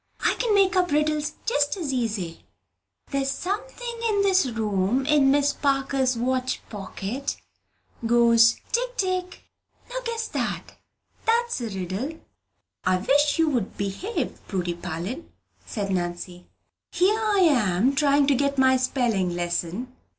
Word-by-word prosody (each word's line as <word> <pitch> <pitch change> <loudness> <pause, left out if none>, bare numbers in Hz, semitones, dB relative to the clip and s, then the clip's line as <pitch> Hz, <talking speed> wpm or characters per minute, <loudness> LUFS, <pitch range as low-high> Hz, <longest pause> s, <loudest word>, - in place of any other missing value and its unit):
"I - - +3
can 465 -4 +2
make 390 -1 +4
up 360 -1 +2
riddles 300 0 +1
just 290 -5 +1
as 305 -7 -3
easy! 210 -9 -3 0.7
There's 275 -1 0
something 470 - -4
in 405 -2 +2
this 380 -7 +3
room, 220 +1 0
in 290 -2 +4
Miss 285 +1 +3
Parker's 270 -2 +1
watch 255 +2 -1
pocket, 210 +6 -4 0.7
goes 230 0 +5 0.2
tick - - -1
tick. 370 -3 -2 0.5
Now - - -4
guess 460 -1 -3
that: - - -4 0.5
that's 470 - +1
a 230 - -3
riddle." 195 - -4 0.6
"I 185 0 +2
wish 285 - +2
you'd 285 -11 0
behave, 200 - -3
Prudy 180 -3 -2
Parlin," 175 - -6 0.4
said 200 -4 -3
Nancy. 175 0 -4 0.4
"Here 380 +5 +2
I 420 -3 +2
am 245 - +3
trying 280 0 +3
to 280 - +3
get 280 +1 0
my 260 0 +5
spelling 230 -9 0
lesson." 175 +8 -3
270 Hz, 130 wpm, -25 LUFS, 205-345 Hz, 0.7 s, goes